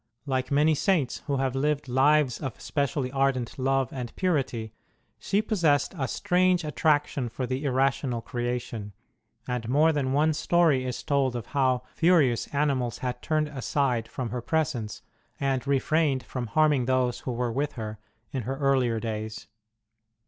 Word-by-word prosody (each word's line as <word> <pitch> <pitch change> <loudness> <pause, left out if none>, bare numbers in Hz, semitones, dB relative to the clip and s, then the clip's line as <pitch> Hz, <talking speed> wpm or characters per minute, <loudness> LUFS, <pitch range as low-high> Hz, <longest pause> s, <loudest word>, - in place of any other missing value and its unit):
Like 130 -2 -1
many 150 +2 +4
Saints 155 -5 +1
who 140 -2 0
have 135 -1 0
lived 145 +1 0
lives 135 0 +3
of 135 -6 -5
specially 140 -3 -1
ardent 135 -2 0
love 135 -1 +1
and 125 -3 -5
purity, 130 - -1 0.5
she 205 +2 0
pos 215 -2 -2
sessed 145 -2 +3
a - - 0
strange 180 +2 +2
attraction 145 -3 +1
for 125 +3 -4
the 130 +3 -3
irrational 130 -2 +1
creation; 120 -3 -4 0.5
and 125 -2 -3
more 155 +5 +4
than 135 -3 0
one 150 +3 +3
story 160 -4 +2
is 125 - -4
told 135 -3 +1
of 120 -3 -4
how 130 -3 +2
furious 160 -9 +3
animals 135 -5 0
had 125 0 -3
turned 155 -1 0
aside 130 -4 -1
from 125 -1 -5
her 125 0 -3
presence, 125 -6 -2 0.4
and 135 -1 -1
refrained 140 0 +1
from 125 -2 -5
harming 150 -1 +3
those 130 -1 +1
who 130 - -4
were 120 0 -1
with 140 +5 -1
her, 110 -3 -6 0.3
in 130 - -2
her 130 +4 -4
earlier 130 -5 +2
days. 110 -1 -5
135 Hz, 155 wpm, -27 LUFS, 125-150 Hz, 0.5 s, many